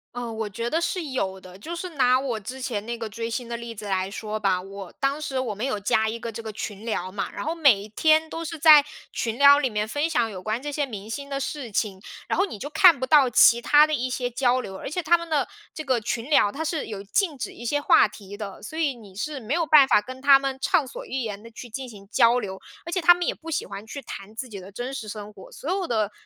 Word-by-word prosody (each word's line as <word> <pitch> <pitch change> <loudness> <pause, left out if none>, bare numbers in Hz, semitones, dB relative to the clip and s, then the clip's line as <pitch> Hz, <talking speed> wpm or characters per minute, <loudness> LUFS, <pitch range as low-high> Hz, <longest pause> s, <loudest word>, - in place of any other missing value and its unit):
呃， 240 -1 -4
我 220 -1 -3
觉 230 +4 -4
得 330 - +1
是 345 +1 -1
有 195 -9 -3
的， 185 0 -13
就 335 +11 -6
是 365 +2 -5
拿 255 -4 +3
我 255 -5 -3
之 250 +6 -8
前 230 -5 -3
那 235 - -3
个 225 -1 -4
追 230 +2 -5
星 235 +1 -4
的 235 - -4
例 235 -1 -7
子 210 - -8
来 190 -1 -1
说 215 +1 -5
吧。 195 -3 +1
我 195 0 -9
当 275 +2 0
时 270 -3 -2
我 245 -4 -2
们 210 +3 -6
有 255 -6 -1
加 220 +2 +1
一 225 - -4
个 230 0 -6
这 225 - -7
个 220 -1 -6
群 210 -1 -6
聊 185 -5 -3
嘛， 200 - -4
然 200 - -6
后 320 - -1
每 280 -12 +4
一 210 - -9
天 315 +8 +3
都 330 +1 -6
是 330 0 -5
在 305 -1 +8 0.3
群 230 0 -2
聊 285 0 +8
里 270 -3 0
面 210 -1 -2
分 290 +7 -1
享 240 -8 +1
有 185 -2 -7
关 215 +4 -2
这 290 +3 -5
些 290 +1 -1
明 215 -7 -6
星 280 +5 -6
的 275 -1 -2
事 275 -3 -5
情， 195 -2 -2 0.3
然 - - -1
后 385 - +4
你 290 - -8
就 275 - -6
看 325 -1 +6
不 260 - -1
到 275 -1 +5
其 235 0 +6
他 295 +4 +6
的 310 - -3
一 255 -3 -1
些 250 -1 -2
交 250 +1 +2
流。 190 -5 -8
而 - - -6
且 355 +5 -3
他 330 +3 +5
们 335 0 -5
的 295 -4 +1 0.3
这 310 - -5
个 255 -4 +1
群 230 +2 -3
聊， 285 -9 +4
它 315 +7 -4
是 320 -2 -2
有 205 -3 -6
禁 305 - 0
止 - - -5
一 - - -11
些 290 +5 0
话 290 - +5
题 200 -1 -11
的， 205 -2 -8
所 310 +9 -7
以 290 -5 +1
你 210 -5 -14
是 290 +8 -4
没 235 +2 -4
有 340 +1 +2
办 300 -3 +7
法 210 - +4
跟 255 +5 -9
他 275 0 +7
们 270 -1 -3
畅 295 0 +2
所 275 - -8
欲 265 - -3
言 210 -4 -5
地 230 - -12
去 240 +2 -10
进 260 +3 -6
行 200 -4 -13
交 235 +1 +4
流。 190 -4 -6 0.2
而 340 - -7
且 365 - 0
他 350 +1 +7
们 350 0 -3
也 - - 0
不 325 +1 -9
喜 - - -1
欢 200 +2 -8
去 280 +6 -7
谈 210 -4 -9
自 250 +2 -5
己 200 -3 -7
的 190 +2 -11
真 245 +6 -5
实 270 -5 -6
生 210 0 -7
活， 200 - -14
所 295 - -7
有 380 0 -1
的 215 -3 0
245 Hz, 305 characters per minute, -25 LUFS, 210-290 Hz, 0.3 s, 在